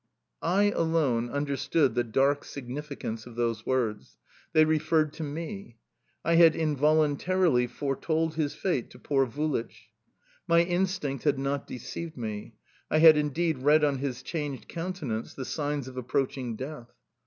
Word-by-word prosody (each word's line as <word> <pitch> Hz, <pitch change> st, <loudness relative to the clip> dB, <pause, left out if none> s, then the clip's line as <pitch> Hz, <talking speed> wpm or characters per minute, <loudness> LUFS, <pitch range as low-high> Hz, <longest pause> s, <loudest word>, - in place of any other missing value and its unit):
I 200 Hz, +4 st, +3 dB
alone 155 Hz, -, +1 dB
understood 140 Hz, 0 st, +1 dB
the 120 Hz, 0 st, +1 dB
dark 135 Hz, +5 st, +1 dB
significance 130 Hz, -4 st, -6 dB
of 120 Hz, -, -11 dB
those 115 Hz, -2 st, -1 dB
words: 120 Hz, -5 st, -1 dB, 0.3 s
they 155 Hz, 0 st, +5 dB
referred 155 Hz, -1 st, +2 dB
to 160 Hz, -, -6 dB
me. 160 Hz, -, -6 dB, 0.5 s
I 170 Hz, 0 st, +4 dB
had 165 Hz, -2 st, +7 dB
involuntarily 155 Hz, -1 st, +2 dB
foretold 155 Hz, +5 st, -1 dB
his 155 Hz, -2 st, -1 dB
fate 170 Hz, -11 st, -1 dB
to -, -, -14 dB
poor 135 Hz, -2 st, +1 dB
Vulich. 115 Hz, -5 st, -3 dB, 0.6 s
My 170 Hz, -1 st, +5 dB
instinct 175 Hz, -6 st, -1 dB
had 145 Hz, -2 st, +3 dB
not 140 Hz, +1 st, -2 dB
deceived 130 Hz, +6 st, -7 dB
me; 110 Hz, -1 st, -5 dB, 0.3 s
I -, -, +2 dB
had 160 Hz, 0 st, +9 dB
indeed 150 Hz, +1 st, 0 dB
read 150 Hz, +3 st, +4 dB
on 140 Hz, -3 st, +2 dB
his 130 Hz, -2 st, -4 dB
changed 145 Hz, -5 st, -4 dB
countenance 165 Hz, -10 st, -4 dB
the 130 Hz, -, -5 dB
signs 145 Hz, -2 st, -2 dB
of 130 Hz, 0 st, -9 dB
approaching 130 Hz, -1 st, -2 dB
death. 130 Hz, 0 st, -7 dB
145 Hz, 140 wpm, -28 LUFS, 125-160 Hz, 0.6 s, had